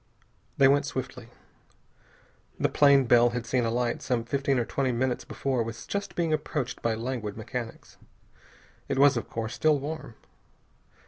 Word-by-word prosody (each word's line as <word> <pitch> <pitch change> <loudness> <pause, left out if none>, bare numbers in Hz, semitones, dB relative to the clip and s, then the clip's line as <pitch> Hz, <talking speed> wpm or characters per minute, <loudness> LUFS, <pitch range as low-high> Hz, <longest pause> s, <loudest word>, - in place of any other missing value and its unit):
They 135 - +6
went 140 +1 +3
swiftly. 125 -3 -5 1.3
The - - +2
plane 140 -2 +5
Bell 120 0 +5
had 120 0 -4
seen 120 +1 0
alight 120 +1 -1
some 120 -2 -1
fifteen 135 +2 0
or 120 - 0
twenty 135 +1 -1
minutes 125 +1 -1
before 130 -3 -2
was 115 0 -5
just 200 -3 -4
being 165 -3 0
approached 150 -4 -3
by 115 -1 0
languid 115 -3 -4
mechanics. 115 +1 -7 0.9
It 135 - -1
was, 140 0 +6
of 120 - -4
course, 115 +1 -4
still 150 +4 +3
warm. 145 -4 -6
125 Hz, 150 wpm, -27 LUFS, 115-140 Hz, 1.3 s, They